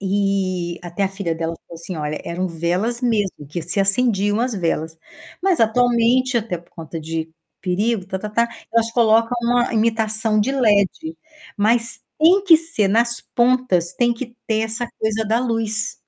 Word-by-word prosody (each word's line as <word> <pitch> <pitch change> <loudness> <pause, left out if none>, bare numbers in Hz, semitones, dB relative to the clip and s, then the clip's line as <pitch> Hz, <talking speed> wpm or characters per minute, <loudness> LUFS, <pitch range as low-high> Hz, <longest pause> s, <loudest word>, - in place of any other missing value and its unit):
E 190 -3 -1
até 175 +3 -4
a - - 0
filha 195 -4 -3
dela 165 0 -3
falou - - -11
assim: 175 +1 -6
"Olha, 150 0 -3
eram 180 +2 -2
velas 180 +8 -1
mesmo, 205 - -1
que 170 +4 -4
se 180 +5 -1
acendiam 205 0 +2
as 245 -1 -1
velas". 165 -3 -2 0.5
Mas, 375 -3 +2
atualmente, 245 +2 +3
até 215 -5 -3
por 170 - -21
conta 165 0 -8
de 160 +1 -4 0.3
perigo, 200 +2 -1
ta-ta-ta, 210 +5 -1 0.2
elas 230 0 +2
colocam 230 0 +3
uma 240 +1 +1
imitação 220 -1 +1
de 245 +6 0
LED, 250 - +1 0.4
mas 230 +2 +1 0.2
tem 350 +6 +5
que 340 -5 +8
ser, 325 -10 -1
nas 235 +3 +2
pontas, 240 -8 +2
tem 240 -1 +2
que 240 0 -8
ter 220 -1 +1
essa 225 +2 -2
coisa 220 0 0
da 225 +2 +2
luz. 225 -2 -1
220 Hz, 160 wpm, -20 LUFS, 185-235 Hz, 0.5 s, que